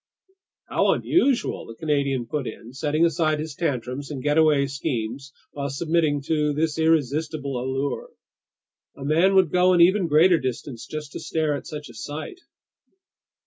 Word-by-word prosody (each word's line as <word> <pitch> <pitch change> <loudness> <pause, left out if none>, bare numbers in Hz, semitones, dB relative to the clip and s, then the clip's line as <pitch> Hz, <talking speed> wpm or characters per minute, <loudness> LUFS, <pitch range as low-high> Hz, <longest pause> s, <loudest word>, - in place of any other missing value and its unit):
"How - - +2
unusual!" 280 -7 +1
the 115 - -9
Canadian 140 -4 0
put 135 +2 -3
in, 115 +2 -9
setting 150 +4 +1
aside 160 -2 +1
his 155 -1 -5
tantrums 140 -3 -3
and 140 -4 -6
getaway 150 -1 +3
schemes 135 -1 -4 0.2
while 140 -1 -4
submitting 155 0 0
to 150 -1 0
this 160 +1 -1
irresistible 150 -3 0
allure. 135 - -3 0.9
"A 135 - -7
man 170 +6 +3
would 185 -5 +4
go 180 0 +4
an 175 - +4
even 185 +1 +5
greater 165 +3 +5
distance 130 -1 -5
just 150 -2 -6
to - - -6
stare 155 -2 -1
at 140 - -7
such 150 -3 -7
a - - -13
sight!" 155 - -7
150 Hz, 150 wpm, -24 LUFS, 140-160 Hz, 0.9 s, even